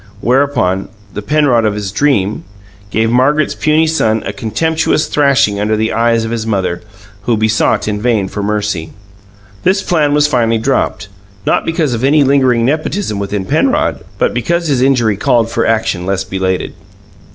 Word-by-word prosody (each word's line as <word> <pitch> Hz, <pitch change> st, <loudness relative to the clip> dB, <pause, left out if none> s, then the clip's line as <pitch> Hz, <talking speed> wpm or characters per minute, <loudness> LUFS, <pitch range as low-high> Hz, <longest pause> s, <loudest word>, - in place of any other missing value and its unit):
Whereupon, 125 Hz, -8 st, 0 dB, 0.2 s
the 105 Hz, -, -5 dB
Penrod 135 Hz, -1 st, +2 dB
of 105 Hz, -2 st, 0 dB
his 105 Hz, -2 st, -4 dB
dream 105 Hz, -4 st, 0 dB, 0.5 s
gave 110 Hz, +2 st, 0 dB
Margaret's 140 Hz, +5 st, +2 dB
puny 155 Hz, +1 st, +2 dB
son 110 Hz, -9 st, 0 dB
a 100 Hz, -, -4 dB
contemptuous 160 Hz, +9 st, 0 dB
thrashing 135 Hz, -8 st, +2 dB
under 105 Hz, +1 st, 0 dB
the 110 Hz, +1 st, -1 dB
eyes 115 Hz, 0 st, +1 dB
of 110 Hz, -, -4 dB
his 115 Hz, -1 st, -3 dB
mother, 95 Hz, -5 st, -1 dB, 0.4 s
who 120 Hz, -2 st, +1 dB
besought 110 Hz, 0 st, +1 dB
in 105 Hz, -1 st, -2 dB
vain 110 Hz, -5 st, +1 dB
for 100 Hz, -, -5 dB
mercy. 100 Hz, -5 st, -2 dB, 0.7 s
This 190 Hz, +2 st, +1 dB
plan 150 Hz, -4 st, +1 dB
was 150 Hz, 0 st, +3 dB
finally 120 Hz, -5 st, +1 dB
dropped, 120 Hz, -4 st, -1 dB, 0.4 s
not -, -, +1 dB
because 160 Hz, -5 st, 0 dB
of 115 Hz, +1 st, -3 dB
any 145 Hz, +2 st, +4 dB
lingering 130 Hz, -4 st, +2 dB
nepotism 155 Hz, -, -2 dB
within 100 Hz, -1 st, -3 dB
Penrod, -, -, 0 dB
but -, -, 0 dB
because 170 Hz, +8 st, -1 dB
his 135 Hz, -3 st, +1 dB
injury 120 Hz, -6 st, +2 dB
called 115 Hz, +2 st, +1 dB
for -, -, 0 dB
action 110 Hz, -5 st, 0 dB
less 95 Hz, 0 st, -1 dB
belated. 95 Hz, -1 st, -2 dB
115 Hz, 165 wpm, -14 LUFS, 105-145 Hz, 0.7 s, any